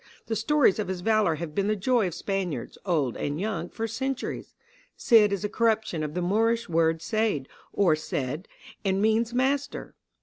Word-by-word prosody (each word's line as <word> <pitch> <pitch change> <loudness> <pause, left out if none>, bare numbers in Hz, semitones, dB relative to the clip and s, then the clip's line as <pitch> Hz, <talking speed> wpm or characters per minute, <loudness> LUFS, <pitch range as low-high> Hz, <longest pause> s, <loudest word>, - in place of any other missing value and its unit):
The 225 - -2
stories 235 -2 +3
of 210 - -1
his 185 -1 -4
valor 215 -4 +2
have 155 -1 -6
been 200 +3 0
the 215 - +2
joy 220 +1 +2
of 170 - -5
Spaniards, 190 -3 -3
old 150 -9 +1
and 145 +2 -3
young, 215 +3 -3
for 225 0 -3
centuries. 265 +4 -4 0.4
Cid 215 -3 +5
is 200 0 -2
a - - +1
corruption 220 -6 0
of 150 +1 -4
the 180 - -1
Moorish 225 +5 +1
word 165 -1 +1
seyd 215 -9 0 0.3
or 175 -6 +3
said, 150 +1 -4 0.4
and 190 -1 +1
means 220 +2 +2
master. 275 +3 -1
205 Hz, 175 wpm, -27 LUFS, 170-225 Hz, 0.4 s, Cid